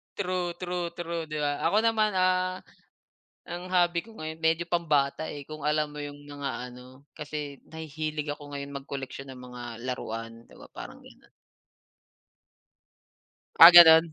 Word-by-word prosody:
true, 180 -3 -2
true, 180 -1 -2
true, 170 -1 -4
'di 155 0 -4
ba? 145 -1 -1
Ako 200 - +2
naman, 220 -2 +2
ah, 185 0 +1 0.9
ang 175 +1 -7
hobby 175 -2 +2
ko 225 - -16
ngayon 160 +1 -7
medyo 165 +1 +1
pambata 155 -3 0
eh, 145 -2 -8
kung 155 -1 -9
alam 150 0 0
mo 150 - -6
yung 145 0 -9
mga 145 -1 -5 0.2
ano, 130 +3 -15
kasi 150 -2 -7
nahihilig 155 -1 -4
ako 145 -1 -13
ngayon 140 0 -6
mag-koleksyon 135 -1 -7
ng 130 - -10
mga 125 -1 -9 0.2
laruan 115 -2 -5
'di - - -19
ba - - -12
parang - - -9
ganun? - - -19 2.3
Ah, 170 +2 +11
ganun? 165 -1 +9
155 Hz, 150 wpm, -27 LUFS, 140-175 Hz, 2.3 s, Ah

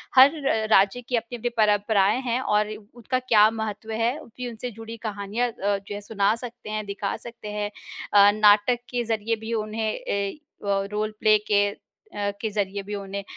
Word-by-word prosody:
हर 265 +2 +9
र 220 -4 +1
राज्य 200 +4 +4
की 245 +1 -2
अपनी-अपनी 235 +1 -2
परंपराएँ 210 0 +3
हैं 245 -1 -1
और 210 -4 +2 0.3
उनका 245 +2 -1
क्या 220 -4 +5
महत्व 220 0 -5
है, 230 +4 0
उनकी 250 -3 -8
उनसे 235 +2 -6
जुड़ी 225 +1 -8
कहानियाँ 210 +2 -2
अ, - - -11 0.2
जो 195 +1 -8
है 205 - -6
सुना 205 -1 +1
सकते 240 -1 -9
हैं, 215 0 -3
दिखा 200 0 -3
सकते 235 -2 -10
हैं 210 0 -2 0.4
अ, 205 0 +8
नाटक 210 +3 +5
के 245 -1 -1
ज़रिए 225 0 -1
भी 220 +1 -6
उन्हें 215 0 -1
अ, 200 +5 -2 0.3
वो 195 0 +1
रोल 215 +1 -1
प्ले 215 0 +5
के 205 -1 +4
अ, - - -12 0.7
के 220 - -1
ज़रिए 200 -1 -2
भी 205 +1 -5
उन्हें 200 0 -5
215 Hz, 185 wpm, -25 LUFS, 205-230 Hz, 0.7 s, हर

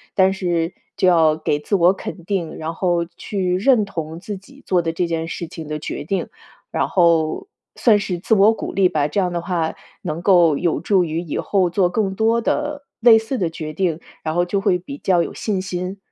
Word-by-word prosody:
但 190 0 +4
是 175 -3 -1 0.2
就 185 - +3
要 160 -3 +5
给 155 -2 -1
自 150 - -1
我 180 0 +5
肯 185 -2 -8
定， 180 -5 -2
然 160 +1 -4
后 175 -2 +1
去 185 -3 -1
认 220 0 +3
同 165 -3 -6
自 200 +1 -6
己 275 +9 -18
做 180 -2 +2
的 165 - -2
这 175 +1 -1
件 165 -1 -2
事 165 0 -5
情 160 -2 -9
的 150 0 -4
决 - - -5
定， 195 -1 -2 0.4
然 - - 0
后 170 - +2 0.3
算 220 -4 +4
是 180 -3 -3
自 220 - +2
我 210 +3 +6
鼓 - - -6
励 190 -2 +3
吧， 150 -3 +1
这 200 - -1
样 180 -2 +1
的 170 - -2
话 170 -2 -1 0.3
能 155 +3 -3
够 175 -5 +5
有 175 -2 0
助 195 -3 +2
于 160 -1 -2
以 165 - -4
后 190 -3 +1
做 180 -1 +2
更 195 +1 -1
多 225 +3 +2
的、 295 +3 -2 0.2
类 230 -1 +7
似 225 +4 -2
的 175 -3 0
决 155 -1 -6
定， 170 -2 -1 0.2
然 155 +1 -3
后 175 0 +2
就 195 +2 -1
会 195 -3 +2
比 235 +11 -9
较 175 -3 +2
有 - - -6
信 205 -4 -2
心。 185 +1 -4
180 Hz, 235 characters per minute, -20 LUFS, 165-200 Hz, 0.4 s, 类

